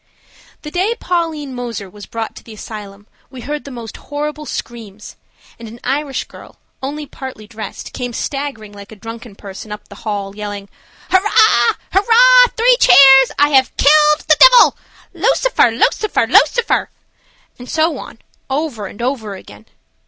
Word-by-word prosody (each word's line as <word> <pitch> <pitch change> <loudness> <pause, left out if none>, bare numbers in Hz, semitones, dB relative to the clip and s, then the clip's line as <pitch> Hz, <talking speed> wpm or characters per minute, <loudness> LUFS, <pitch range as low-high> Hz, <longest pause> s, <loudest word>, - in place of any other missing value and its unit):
THE 300 - -8
day 380 +7 -1
Pauline 325 -6 -3
Moser 235 -5 -6
was 205 +1 -13
brought 225 -1 -6
to - - -13
the 225 - -12
asylum 205 -2 -10 0.2
we 255 -1 -11
heard 295 +4 -6
the - - -8
most 235 -4 -9
horrible 300 +1 -6
screams, 215 -4 -8 0.4
and 230 - -9
an 230 +2 -12
Irish 275 +1 -2
girl, - - -16 0.2
only 290 +3 -5
partly 260 -5 -10
dressed, 220 0 -9
came 245 -1 -5
staggering 265 -5 -5
like 200 0 -13
a - - -11
drunken 225 +1 -10
person 200 +1 -10
up 210 0 -9
the 200 - -13
hall, 200 -2 -5
yelling, 205 -1 -7 0.4
"Hurrah! 375 - +3 0.8
Three - - +4
cheers! 270 - +7
I 290 +1 +3
have 265 -2 +2
killed 300 +1 +4
the 310 0 +4
divil! - - +7 0.4
Lucifer, 475 +7 +2
Lucifer, 430 - 0
Lucifer," 475 -1 +2 0.7
and 245 - -11
so 315 -2 0
on, - - -11 0.3
over 265 -7 -3
and 210 +5 -9
over 235 -6 -3
again. 105 - -15
255 Hz, 150 wpm, -16 LUFS, 215-300 Hz, 0.8 s, cheers